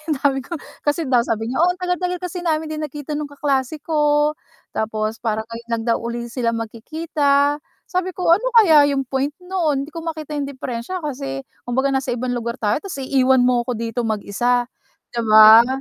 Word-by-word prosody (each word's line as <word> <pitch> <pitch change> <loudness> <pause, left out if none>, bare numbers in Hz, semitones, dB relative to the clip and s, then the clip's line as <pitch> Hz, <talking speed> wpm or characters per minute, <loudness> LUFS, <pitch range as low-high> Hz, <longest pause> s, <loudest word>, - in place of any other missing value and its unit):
ang 310 - +1
dami 275 -1 +3
kong 340 +2 -7 0.2
kasi 295 +3 0
daw 245 -2 +3
sabi 225 -1 -2
niya, 260 - -2
"Oo, 355 - +5
ang - - -20
tagal-tagal 360 0 -1
kasi 360 0 -4
namin 315 -2 -1
di 310 - -4
nagkita 295 0 -5
nung 295 -1 -4
kaklase 280 0 -1
ko," 295 -1 +2 0.4
tapos 220 0 -2
parang 220 -1 -1
ngayon 230 +1 -9
lang 225 - -3
daw 230 - +3
uli 235 0 -4
sila 240 -2 0
magkikita. 285 +5 0 0.3
Sabi 365 0 -2
ko, 360 -2 0
"Ano 410 +9 +4
kaya 320 -10 +7
yung 270 - 0
point 270 +2 -2
no'n 335 -7 0
hindi 285 - -8
ko 330 +1 -8
makita 310 -2 -4
yung 280 - -2
deperensya 260 +5 -5
kasi 275 -1 -4 0.2
kumbaga 265 +3 +1
nasa 265 -2 -1
ibang 250 +1 -3
lugar 235 +1 -4
tayo 210 +4 +2
tapos 385 +4 -7
iiwan 260 -1 +3
mo 245 -1 +2
ko 250 - -1
dito 230 +1 -3
mag-isa," 240 +3 0 0.4
di 240 - -6
ba? 220 +2 +9
275 Hz, 195 wpm, -21 LUFS, 235-310 Hz, 0.4 s, ba